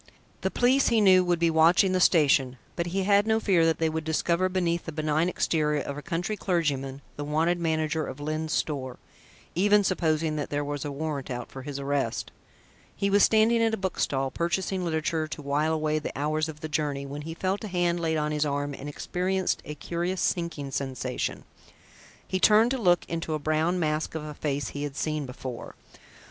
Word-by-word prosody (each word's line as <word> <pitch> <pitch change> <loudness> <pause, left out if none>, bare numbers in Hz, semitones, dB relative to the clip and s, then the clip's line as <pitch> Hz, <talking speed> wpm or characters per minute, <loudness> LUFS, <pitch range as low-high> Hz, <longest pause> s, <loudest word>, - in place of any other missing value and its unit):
The - - 0
police, 260 +3 +3
he 230 -2 +3
knew, 185 -3 +6
would 175 -1 +1
be 165 0 +2
watching 165 +4 +5
the 185 - +2
station, 140 -7 +4 0.2
but 170 0 -2
he 190 +3 -1
had 200 +2 +4
no 220 0 +3
fear 180 -7 +3
that 165 - +2
they 165 - +1
would 160 0 -2
discover 170 +3 +1
beneath 175 -2 0
the 160 - -5
benign 155 +2 0
exterior 150 -4 +1
of 140 - -5
a 145 - -6
country 175 +6 -2
clergyman, 145 -8 -1
the 145 - -3
wanted 160 +4 +1
manager 160 -1 0
of 130 - -7
Lyne's 155 +1 -3
Store, 130 -5 -2 0.6
even 205 +3 +4
supposing 160 -4 0
that 145 - -3
there 145 0 -1
was 145 -1 -3
a 145 - -4
warrant 140 -2 -4
out 125 -2 -5
for 135 - -8
his 140 +1 -6
arrest. 140 -4 -2 0.6
He 200 0 0
was 205 +1 +5
standing 225 +2 +4
at 225 -1 +2
a - - -10
bookstall, 135 -8 -1
purchasing 180 +4 -1
literature 160 -1 -1
to 155 - -7
while 145 +3 +1
away 155 -1 0
the 150 - -6
hours 155 +2 0
of 150 -1 -9
the 155 - -3
journey, 145 -2 -2
when 140 +2 -6
he 165 +2 -6
felt 190 +4 -2
a - - -3
hand 175 -2 0
laid 160 -1 0
on 150 0 -1
his 150 0 +1
arm 145 -1 -2
and 140 +1 -7
experienced 185 +5 -1
a 150 - -6
curious 175 +5 -3
sinking 170 -6 -1
sensation. 130 -2 -3 0.8
He 185 - -1
turned 220 +5 +5
to 265 - -1
look 175 -5 +3
into 165 -1 -3
a - - 0
brown 155 +4 0
mask 155 -1 -1
of 160 - -3
a 150 - -6
face 145 -1 -2
he 145 - -6
had 145 -1 -4
seen 155 -2 -2
before. 125 -1 -7
160 Hz, 205 wpm, -27 LUFS, 145-180 Hz, 0.8 s, knew